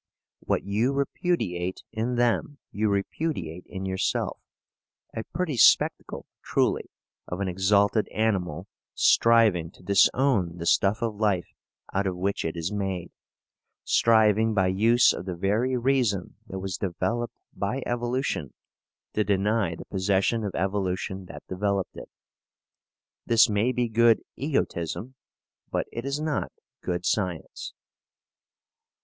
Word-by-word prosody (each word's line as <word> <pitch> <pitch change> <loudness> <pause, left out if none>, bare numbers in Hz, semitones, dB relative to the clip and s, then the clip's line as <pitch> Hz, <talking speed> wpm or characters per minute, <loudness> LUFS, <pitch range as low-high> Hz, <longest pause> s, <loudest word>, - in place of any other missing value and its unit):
What - - -1
you 110 +7 0
repudiate 130 - -1
in 115 +2 -2
them 120 +4 +1
you 105 +1 0
repudiate 100 - -3
in 95 0 -6
yourself 95 0 -1 0.7
a 110 - -4
pretty 170 -7 -3
spectacle, - - +3 0.2
truly, - - 0 0.4
of 90 - -5
an 100 - -1
exalted 100 +3 +2
animal 95 -8 -1 0.3
striving 110 -8 +4
to 90 - -19
disown 100 -2 +3
the 85 - -5
stuff 100 +6 +2
of 115 -2 0
life 100 -5 0 0.4
out 95 0 +1
of 90 -1 -2
which 100 +2 -1
it 80 +1 -3
is 85 +3 -2
made, 95 -4 -3 0.7
striving 110 -1 +4
by 95 -2 +3
use 115 +6 +4
of - - -6
the 90 -2 -4
very 110 +8 +1
reason 120 -7 0
that 95 - -6
was 95 -1 -4
developed 110 +6 -2 0.2
by 125 +7 -2
evolution 120 - -2 0.6
to 105 - +2
deny 100 -2 +1
the - - -10
possession 100 +4 +1
of 100 - -4
evolution 95 0 -2
that - - -10
developed 100 0 -1
it. - - -9 1.2
This 115 0 +6
may 105 +3 +1
be 125 -1 0
good 115 0 +4
egotism, 130 - -2 0.6
but - - -1
it 115 +2 -5
is 140 +1 -2
not 155 -1 -2 0.3
good 90 0 -3
science. 90 -7 -2
100 Hz, 130 wpm, -26 LUFS, 95-115 Hz, 1.2 s, This